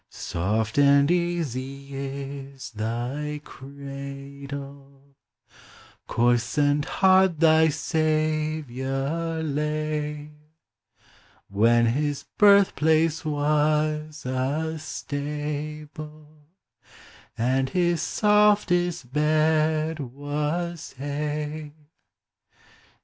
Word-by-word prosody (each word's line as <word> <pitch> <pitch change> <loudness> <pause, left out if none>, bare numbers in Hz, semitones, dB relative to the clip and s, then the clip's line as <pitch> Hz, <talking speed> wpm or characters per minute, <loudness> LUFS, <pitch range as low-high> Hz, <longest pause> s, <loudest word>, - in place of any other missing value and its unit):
Soft 110 +8 -1
and 140 +1 +5
easy 140 -6 -2
is 135 -1 -6
thy 120 +7 -3
cradle: 140 0 -9 0.9
Coarse 120 +1 +1
and 145 0 +3
hard 190 -3 +4
thy 160 -1 +5
Saviour 155 -1 -1
lay: 150 0 -2 1.2
When 115 +4 +4
his 145 +4 -1
birthplace 165 -6 +4
was 150 0 0
a 145 +5 -1
stable, 150 +1 -6 0.9
And 130 +3 +1
his 175 0 +1
softest 195 - +2
bed 155 +1 +2
was 150 +5 -3
hay. 150 +2 -4
150 Hz, 65 wpm, -25 LUFS, 140-155 Hz, 1.2 s, and